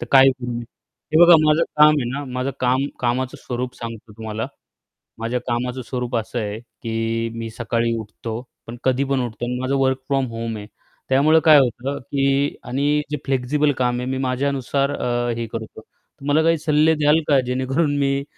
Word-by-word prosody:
तर 120 - -5
काय 135 0 +8
करू 125 -2 -2
मी? 120 0 -4 0.5
हे 155 - +5
बघा 175 0 +9
माझं 155 +2 +4
काम 150 0 +8
आहे - - -2
ना, 145 +3 -4
माझं 130 0 -3
काम 130 +2 +2
कामाचं 125 +1 -1
स्वरूप 125 0 -4
सांगतो 115 -2 -8
तुम्हाला, 110 +1 -5 0.7
माझ्या 115 +2 -1
कामाचं 125 +1 -2
स्वरूप 125 0 -4
असं 115 +2 -3
आहे, 105 -1 -4
की 115 0 -3
मी 115 0 -5
सकाळी 115 0 0
उठतो 110 +2 -6 0.3
पण 120 +1 -7
कधी 130 +1 +2
पण 135 -1 +1
उठतो 120 0 -5
अन् 125 +1 -2
माझं 130 +2 -1
वर्क 130 -1 +2
फ्रॉम 135 -1 +1
होम 115 -1 -4
आहे, 105 0 -9 0.4
त्यामुळं 145 +5 +5
काय 155 -2 +9
होतं 130 +2 -1
की 140 +2 0
आणि 140 +4 +1
जे 150 - -1
फ्लेक्सिबल 140 +3 +1
काम 125 -1 +1
आहे 125 - -3
मी 130 - -1
माझ्यानुसार 135 +1 0
अ, 120 0 -1
हे 115 - -2
करतो. 110 0 -7
तर 140 +5 -20
मला 150 +2 +3
काही 165 0 +3
सल्ले 155 0 +3
द्याल 150 +1 +4
का 140 -3 +5
जेणेकरून 135 +4 0
मी 140 0 +1
130 Hz, 185 wpm, -21 LUFS, 120-140 Hz, 0.7 s, बघा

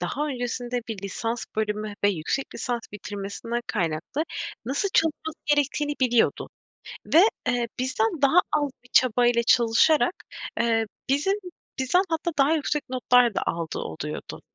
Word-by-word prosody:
daha 260 +12 -2
öncesinde 245 -2 -3
bir 210 -4 -5
lisans 225 +4 -3
bölümü 210 -1 -2
ve - - +6
yüksek 185 - -3
lisans 240 -2 -2
bitirmesinden 205 +3 -5
kaynaklı 170 - -2 0.4
nasıl 280 - -1
çalışması 320 0 +1
gerektiğini 290 0 +1
biliyordu 245 -3 +2 0.7
ve, 340 - +9 0.3
eee, 240 -2 +1
bizden 290 - 0
daha 280 +6 +5
az 290 -2 +1
bir - - -19
çabayla 240 -1 +4
çalışarak, 245 - +4 0.5
eee, 225 -1 +2 0.2
bizim 290 +9 +2 0.4
bizden 265 +8 +3
hatta 330 +1 -1
daha 275 +3 +4
yüksek 300 -1 0
notlar 250 -3 +4
da - - -1
aldığı 165 -1 -2
oluyordu. 150 -2 -6
245 Hz, 130 wpm, -25 LUFS, 225-290 Hz, 0.7 s, ve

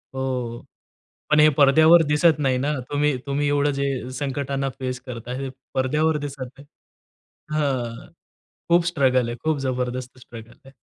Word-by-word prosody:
हो. 125 -3 -3 0.7
पण 150 0 +5
हे 155 - +7
परद्यावर 155 +4 +6
दिसत 155 +2 +3
नाही 130 -3 +1
ना. 145 +4 0 0.2
तुम्ही 145 -1 +1
तुम्ही 145 +1 0
एवढं 145 0 +2
जे 135 -2 -2
संकटांना 140 -1 -2
फेस 125 -1 -4
करताय 125 0 -6
हे 135 - -3 0.3
परद्यावर 150 +4 +1
दिसत 145 -1 -7 0.2
नाही 140 - -14 0.9
हां. 130 -6 -2 0.6
खूप 170 0 +5
स्ट्रगल 130 -7 +2
आहे. 120 - -4
खूप 155 -1 +1
जबरदस्त 125 0 -3
स्ट्रगल 115 -2 -12
आहे. 135 - -15
135 Hz, 145 wpm, -23 LUFS, 125-150 Hz, 0.9 s, हे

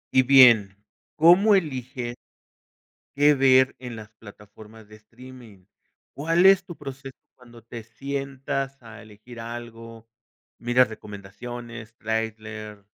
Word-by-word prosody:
Y 130 - +7
bien, 120 -7 +5 0.4
¿cómo 185 +6 +5
elige? 130 -7 -3 1.0
¿que 145 0 +5
ver 130 -1 +4
en 125 -2 -9
las 110 -1 -11
plataformas 110 0 -16
de 110 - -15
streaming? 115 -3 -16 0.5
¿Cuál 165 +5 +3
es 195 -1 +5
tu 175 - -10
proceso 135 -2 -10 0.2
cuando 120 -2 -17
te 115 -1 -10
sientas 135 +2 -5
a 115 -1 -13
elegir 110 +3 -14
algo?, 115 -1 -10 0.5
¿miras 120 +2 +2
recomendaciones, 115 +3 -10
trailer 110 -1 -5
120 Hz, 110 wpm, -24 LUFS, 110-135 Hz, 1.0 s, Y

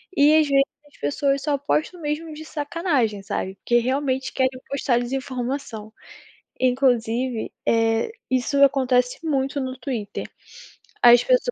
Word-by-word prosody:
E 295 0 +5
às 310 -1 +3
vezes 275 -1 +4 0.2
as 290 - -22
pessoas 275 - 0
só 290 -1 0
postam 300 +5 -1
mesmo 305 +2 -3
de 310 +1 -9
sacanagem, 290 - -1
sabe? 190 -1 -4
Porque 240 +4 +1
realmente 265 +1 -1
querem 260 0 0
postar 275 -3 +1
desinformação. 250 -3 -4 0.7
Inclusive, 250 -2 +1
eh, 225 - +2 0.2
isso 260 +2 +1
acontece 255 -2 +2
muito 275 -1 0
no 260 -1 -4
Twitter. 245 -5 -4 0.8
As 240 0 +7
pesso - - +2
265 Hz, 130 wpm, -23 LUFS, 240-285 Hz, 0.8 s, As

